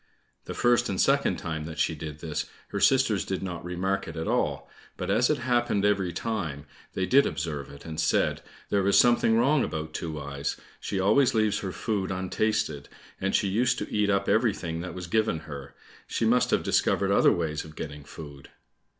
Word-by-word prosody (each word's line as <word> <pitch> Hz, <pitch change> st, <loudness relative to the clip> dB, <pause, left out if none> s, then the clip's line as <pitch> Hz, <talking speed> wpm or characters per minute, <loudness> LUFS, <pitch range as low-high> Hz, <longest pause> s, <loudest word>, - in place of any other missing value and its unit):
The -, -, -6 dB
first 120 Hz, 0 st, +3 dB
and 95 Hz, -, -2 dB
second -, -, +3 dB
time 80 Hz, -2 st, -4 dB
that 80 Hz, 0 st, -7 dB
she -, -, +1 dB
did 75 Hz, 0 st, -7 dB
this, 80 Hz, -3 st, -3 dB, 0.2 s
her -, -, -3 dB
sisters 120 Hz, -9 st, +3 dB
did 95 Hz, -1 st, -3 dB
not 90 Hz, -3 st, -5 dB
remark 95 Hz, +2 st, -2 dB
it 80 Hz, -, -7 dB
at 80 Hz, -, -3 dB
all, -, -, 0 dB, 0.3 s
but -, -, -2 dB
as 125 Hz, -, +3 dB
it 150 Hz, -, +2 dB
happened 120 Hz, -5 st, +1 dB
every 100 Hz, -3 st, +2 dB
time, 85 Hz, -7 st, -3 dB, 0.3 s
they 95 Hz, -, 0 dB
did 140 Hz, +7 st, +5 dB
observe 75 Hz, -4 st, -4 dB
it, 70 Hz, -, -12 dB
and 80 Hz, -1 st, -5 dB
said, 80 Hz, -, +1 dB, 0.3 s
"There 100 Hz, -1 st, +2 dB
is 100 Hz, -, +5 dB
something 120 Hz, -2 st, +5 dB
wrong 135 Hz, +3 st, +3 dB
about 80 Hz, 0 st, -4 dB
Two 80 Hz, -2 st, -4 dB
eyes, 70 Hz, -1 st, -4 dB, 0.2 s
she 95 Hz, -, -3 dB
always 120 Hz, +7 st, +4 dB
leaves 110 Hz, -1 st, +2 dB
her 95 Hz, -3 st, -4 dB
food 95 Hz, +2 st, -2 dB
untasted, 95 Hz, +4 st, -1 dB, 0.3 s
and 95 Hz, +1 st, 0 dB
she 100 Hz, -, +2 dB
used 125 Hz, +6 st, +2 dB
to -, -, -5 dB
eat 105 Hz, -1 st, +2 dB
up 100 Hz, 0 st, +1 dB
everything 100 Hz, -7 st, +1 dB
that 90 Hz, -1 st, -6 dB
was 90 Hz, -1 st, -5 dB
given 110 Hz, -4 st, 0 dB
her; 70 Hz, -3 st, -9 dB, 0.3 s
she 115 Hz, -, -1 dB
must 125 Hz, +3 st, +3 dB
have -, -, +2 dB
discovered -, -, +2 dB
other -, -, +5 dB
ways 80 Hz, -3 st, -1 dB
of 75 Hz, 0 st, -12 dB
getting 75 Hz, -1 st, -7 dB
food." 70 Hz, -1 st, -11 dB
95 Hz, 195 wpm, -27 LUFS, 80-110 Hz, 0.3 s, did